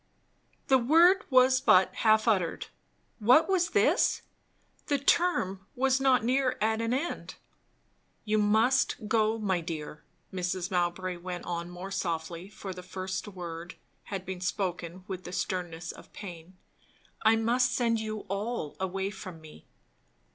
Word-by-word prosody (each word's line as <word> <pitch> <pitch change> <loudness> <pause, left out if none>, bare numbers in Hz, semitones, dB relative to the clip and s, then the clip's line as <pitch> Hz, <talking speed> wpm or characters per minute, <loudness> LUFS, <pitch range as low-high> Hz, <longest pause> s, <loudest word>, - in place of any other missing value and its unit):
the 265 -1 +4
word 340 +10 +5
was 255 -1 +5
but 185 +1 +5
half 220 0 +3
uttered. 185 -7 +1 0.5
What 245 +9 +5
was 365 -3 +2
this? - - +2 0.6
The 285 - +2
term 230 - +1
was 265 +1 +2
not 260 -4 +3
near 255 +1 +1
at 220 +1 +1
an 230 0 -1
end. 275 +7 -3 0.9
"You 215 0 +1
must 220 +2 +2
go, 220 0 +2
my 190 -5 0
dear," 155 -3 -6 0.3
Mrs. 180 0 -2
Mowbray 180 0 -1
went 180 0 -6
on 170 0 -4
more 180 +2 -8
softly; 170 -1 -3
for 200 -2 -7
the 180 - -9
first 185 +2 -5
word 175 -2 -7 0.3
had 195 -2 -5
been 185 -1 -6
spoken 180 -1 -3
with 185 -2 -5
the 180 - -8
sternness 175 -2 -3
of - - -15
pain. 180 -2 -10 0.6
"I 220 +1 +5
must 235 +3 +2
send 230 -2 +1
you 215 -1 -4
all 200 -4 -4
away 190 +1 -2
from 185 -4 -9
me." 155 - -15
195 Hz, 140 wpm, -29 LUFS, 180-235 Hz, 0.9 s, word